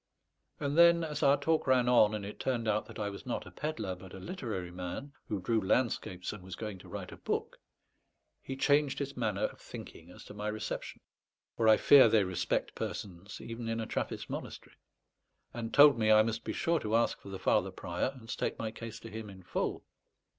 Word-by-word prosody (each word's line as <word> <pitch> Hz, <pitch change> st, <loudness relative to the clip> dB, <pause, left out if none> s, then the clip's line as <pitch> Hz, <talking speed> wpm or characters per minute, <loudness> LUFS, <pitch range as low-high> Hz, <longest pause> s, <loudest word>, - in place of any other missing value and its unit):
And 145 Hz, +2 st, 0 dB
then, 170 Hz, 0 st, +7 dB
as 150 Hz, -2 st, -3 dB
our 140 Hz, +1 st, +5 dB
talk 160 Hz, +1 st, +1 dB
ran 130 Hz, -2 st, +4 dB
on, 110 Hz, -4 st, +5 dB
and 105 Hz, -2 st, -4 dB
it 105 Hz, -, -8 dB
turned 120 Hz, -4 st, -1 dB
out 105 Hz, 0 st, +1 dB
that 115 Hz, -, -10 dB
I 105 Hz, -1 st, -2 dB
was 100 Hz, -, -9 dB
not 125 Hz, -, -2 dB
a -, -, -11 dB
pedlar, 150 Hz, -11 st, -3 dB
but 90 Hz, +1 st, -11 dB
a -, -, -8 dB
literary 100 Hz, -, -5 dB
man, 90 Hz, +11 st, -6 dB
who 105 Hz, -, -2 dB
drew 110 Hz, +4 st, +1 dB
landscapes 95 Hz, -4 st, 0 dB
and 105 Hz, -, -9 dB
was 95 Hz, 0 st, -7 dB
going 105 Hz, -4 st, -6 dB
to -, -, -14 dB
write -, -, -6 dB
a -, -, -10 dB
book, -, -, -3 dB, 0.8 s
he 135 Hz, -, -5 dB
changed 145 Hz, 0 st, +3 dB
his 140 Hz, -1 st, -4 dB
manner -, -, -1 dB
of -, -, -3 dB
thinking 85 Hz, +1 st, -10 dB
as 90 Hz, -, -12 dB
to -, -, -10 dB
my 105 Hz, 0 st, -4 dB
reception 105 Hz, 0 st, -4 dB, 0.5 s
(for 115 Hz, -, +1 dB
I 110 Hz, -1 st, +8 dB
fear 140 Hz, -2 st, +8 dB
they 110 Hz, -3 st, +4 dB
respect 95 Hz, -2 st, -1 dB
persons 100 Hz, +1 st, -6 dB
even 115 Hz, 0 st, -5 dB
in 115 Hz, 0 st, -1 dB
a 110 Hz, -, -2 dB
Trappist -, -, -3 dB
monastery), -, -, -7 dB, 0.8 s
and 115 Hz, -1 st, -4 dB
told 145 Hz, -4 st, +7 dB
me 110 Hz, -1 st, +4 dB
I 110 Hz, 0 st, +7 dB
must 115 Hz, 0 st, -2 dB
be -, -, -3 dB
sure 170 Hz, -1 st, +1 dB
to 110 Hz, -3 st, -1 dB
ask 115 Hz, -, +1 dB
for -, -, -10 dB
the 95 Hz, -, -5 dB
Father 95 Hz, -, +2 dB
Prior, 85 Hz, 0 st, -2 dB
and 115 Hz, -3 st, -13 dB
state -, -, -2 dB
my 110 Hz, -1 st, -3 dB
case 115 Hz, 0 st, -8 dB
to 115 Hz, -, -9 dB
him 110 Hz, 0 st, -6 dB
in 95 Hz, -1 st, -12 dB
full. -, -, -2 dB
110 Hz, 215 wpm, -32 LUFS, 100-130 Hz, 0.8 s, I